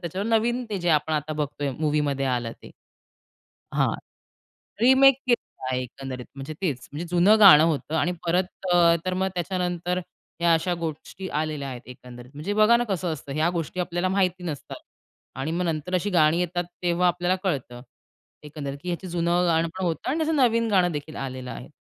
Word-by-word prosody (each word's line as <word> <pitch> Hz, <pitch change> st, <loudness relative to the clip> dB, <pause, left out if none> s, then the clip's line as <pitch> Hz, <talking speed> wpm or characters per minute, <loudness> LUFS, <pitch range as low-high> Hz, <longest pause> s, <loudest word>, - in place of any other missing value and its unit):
त्याच्यावर 185 Hz, +4 st, -4 dB
नवीन 240 Hz, +2 st, +1 dB
ते 200 Hz, -, -2 dB
जे 175 Hz, 0 st, -2 dB
आपण 155 Hz, +1 st, +2 dB
आता 155 Hz, 0 st, -1 dB
बघतोय 145 Hz, -1 st, -3 dB
मूव्हीमध्ये 145 Hz, -3 st, 0 dB
आलं 120 Hz, -3 st, -1 dB
ते. -, -, -12 dB, 1.0 s
हां. -, -, +2 dB, 0.9 s
रिमेक 265 Hz, +1 st, +7 dB
केलेलं 240 Hz, -, -1 dB
आहे 130 Hz, 0 st, 0 dB
एकंदरीत 130 Hz, 0 st, -7 dB
म्हणजे 140 Hz, +3 st, -6 dB
तेच 140 Hz, -9 st, -2 dB
म्हणजे 160 Hz, +4 st, -5 dB
जुनं 185 Hz, +5 st, +5 dB
गाणं 170 Hz, -7 st, +9 dB
होतं 160 Hz, -1 st, 0 dB
आणि 175 Hz, +3 st, +1 dB
परत 180 Hz, +2 st, +2 dB, 0.3 s
अ, 170 Hz, -1 st, +5 dB
तर 185 Hz, -, 0 dB
मग 190 Hz, +1 st, 0 dB
त्याच्यानंतर 180 Hz, 0 st, -2 dB, 0.4 s
ह्या 170 Hz, -1 st, +4 dB
अशा 175 Hz, +2 st, +1 dB
गोष्टी 170 Hz, +3 st, -6 dB
आलेल्या 155 Hz, -3 st, -3 dB
आहेत 125 Hz, -2 st, -7 dB
एकंदरीत. 125 Hz, 0 st, -12 dB
म्हणजे 155 Hz, +8 st, -4 dB
बघा 215 Hz, +3 st, +5 dB
ना, 240 Hz, -, 0 dB
कसं 185 Hz, -6 st, -2 dB
असतं 140 Hz, -2 st, -9 dB
ह्या 155 Hz, +3 st, +2 dB
गोष्टी 170 Hz, +1 st, -4 dB
आपल्याला 175 Hz, +1 st, -1 dB
माहिती 185 Hz, -2 st, 0 dB
नसतात 155 Hz, -5 st, -6 dB, 0.6 s
आणि 150 Hz, +4 st, -2 dB
मग 175 Hz, +1 st, -1 dB
नंतर 160 Hz, +2 st, -3 dB
अशी 195 Hz, +3 st, 0 dB
गाणी 160 Hz, -2 st, +3 dB
येतात, 175 Hz, 0 st, -1 dB, 0.2 s
तेव्हा 175 Hz, +1 st, +2 dB
आपल्याला 175 Hz, +1 st, +1 dB
कळतं, 130 Hz, -9 st, -3 dB, 0.6 s
एकंदरीत, 145 Hz, -2 st, -6 dB
की 180 Hz, -, -4 dB
ह्याचं 175 Hz, +2 st, -4 dB
जुनं 175 Hz, +1 st, +1 dB
गाणं 165 Hz, 0 st, +2 dB
पण 190 Hz, -, -3 dB
होतं 165 Hz, +6 st, -2 dB
आणि 295 Hz, -, 0 dB
त्याचं 315 Hz, 0 st, +1 dB
नवीन 230 Hz, -4 st, +3 dB
गाणं 180 Hz, -3 st, +3 dB
देखील 150 Hz, +1 st, -6 dB
आलेलं 130 Hz, -2 st, -5 dB
आहे, 125 Hz, -, -8 dB
170 Hz, 180 wpm, -25 LUFS, 150-185 Hz, 1.0 s, गाणं